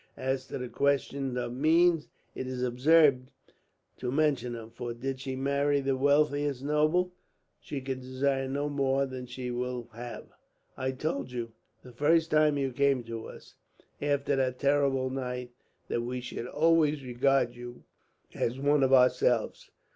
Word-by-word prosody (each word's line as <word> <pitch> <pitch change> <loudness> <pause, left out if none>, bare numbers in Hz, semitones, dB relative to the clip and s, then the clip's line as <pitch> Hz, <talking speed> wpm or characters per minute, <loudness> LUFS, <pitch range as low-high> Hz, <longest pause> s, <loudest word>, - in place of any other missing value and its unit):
As 130 0 -2
to - - -5
the 125 -1 -5
question 140 -1 0
of 120 -1 -3
means, 165 +4 +3 0.3
it 130 - -5
is 130 -1 -3
absurd 130 +1 +4 0.7
to 125 - -3
mention 140 -4 +1
them; 115 -1 -8
for 120 0 -6
did 130 +2 -4
she 130 0 -4
marry 140 +2 +1
the 135 -1 0
wealthiest 145 0 +2
noble, 155 +5 +1 0.5
she 140 - -6
could 130 0 -4
desire 135 +1 -1
no 140 +2 -2
more 140 -1 +1
than 130 -1 -7
she 125 0 -5
will 125 -1 -4
have. 120 +1 -7 0.5
I 130 0 -2
told 140 -1 -3
you, 120 -2 -4 0.3
the 125 - -12
first 160 +5 +2
time 150 -1 +4
you 135 -1 -1
came 140 -1 +2
to 115 -1 -6
us - - -13 0.5
after 145 -1 +1
that 130 -1 0
terrible 140 -2 +1
night, 125 -2 -4 0.4
that 120 - -1
we 125 +2 -3
should 125 -1 -6
always 155 -1 +2
regard 125 0 +1
you 120 0 -10 0.5
as 120 +3 -1
one 145 +1 +3
of 135 -1 +3
ourselves. 125 -2 +3
135 Hz, 155 wpm, -29 LUFS, 125-145 Hz, 0.7 s, absurd